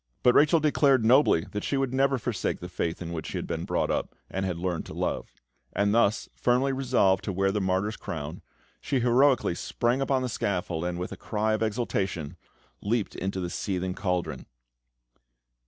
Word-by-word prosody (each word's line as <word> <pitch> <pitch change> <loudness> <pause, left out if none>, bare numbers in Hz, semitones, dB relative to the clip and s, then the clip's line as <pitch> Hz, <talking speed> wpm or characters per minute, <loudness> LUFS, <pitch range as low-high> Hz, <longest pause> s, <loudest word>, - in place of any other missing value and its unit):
But 125 - +6
Rachel 155 +5 +5
declared 140 -5 +3
nobly 125 - +5
that 105 - -3
she 140 - 0
would 135 -2 0
never 135 0 +3
forsake 120 -4 -2
the 90 - -7
faith 90 -1 -3
in 85 0 -5
which 80 - -4
she - - -4
had - - -3
been - - -3
brought - - 0
up, - - -2 0.2
and 95 0 -1
had 90 -2 -2
learned 90 -1 -2
to - - -8
love; - - -2 0.4
and 100 0 +2
thus 115 -2 +2
firmly 125 +2 +2
resolved 120 -8 +2
to 100 - -1
wear 95 +1 +1
the 105 +1 -1
martyr's 95 +3 0
crown, 80 +1 -6 0.4
she 135 -3 -1
heroically 125 -2 +4
sprang 120 +8 -1
upon 135 -1 +1
the - - 0
scaffold, 90 -6 -2
and 90 0 -2
with 90 +1 -4
a - - -7
cry 110 0 -1
of 110 - -1
exultation, 100 - -2 0.5
leapt 110 0 -1
into 95 +1 -3
the 90 -1 -3
seething 95 -2 -2
cauldron. 90 -2 -2
105 Hz, 190 wpm, -27 LUFS, 90-125 Hz, 0.5 s, But